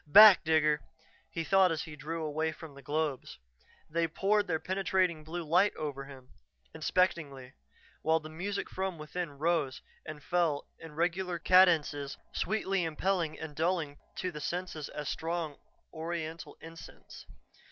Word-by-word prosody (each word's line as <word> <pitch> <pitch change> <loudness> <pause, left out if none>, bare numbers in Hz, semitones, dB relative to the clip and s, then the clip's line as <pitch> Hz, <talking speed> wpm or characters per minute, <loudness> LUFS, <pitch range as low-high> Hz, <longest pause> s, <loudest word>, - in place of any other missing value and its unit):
"Back, 205 +5 +10
Digger!" 155 -1 +3 0.5
he 165 - -3
thought 190 +1 +4
as 160 -2 -1
he 160 -2 -9
drew 160 +3 -4
away 155 +1 -1
from 155 -1 -11
the 140 - -12
globes. 150 -2 -2 0.5
They 165 +1 0
poured 205 +5 +1
their 165 -3 +1
penetrating 185 -3 0
blue 170 +3 -5
light 180 +6 +3
over 140 -3 -4
him, 130 -2 -13 0.4
inspectingly, 140 -8 0 0.5
while 160 +1 +3
the 155 - -9
music 180 +6 -3
from 190 -2 -3
within 150 -1 -5
rose 155 -4 0 0.2
and 150 -2 -8
fell 170 -5 +1
in 165 -2 -11
regular 175 +2 0
cadences, 160 -6 +4 0.2
sweetly 195 -4 0
impelling 165 0 -1
and 155 -2 -7
dulling 160 -3 -1 0.2
to 185 - -2
the 150 -3 -7
senses 165 -1 -4
as 150 -1 -6
strong 165 -3 -3 0.4
oriental 160 -2 -5
incense. 165 0 -12
160 Hz, 140 wpm, -31 LUFS, 150-180 Hz, 0.5 s, Back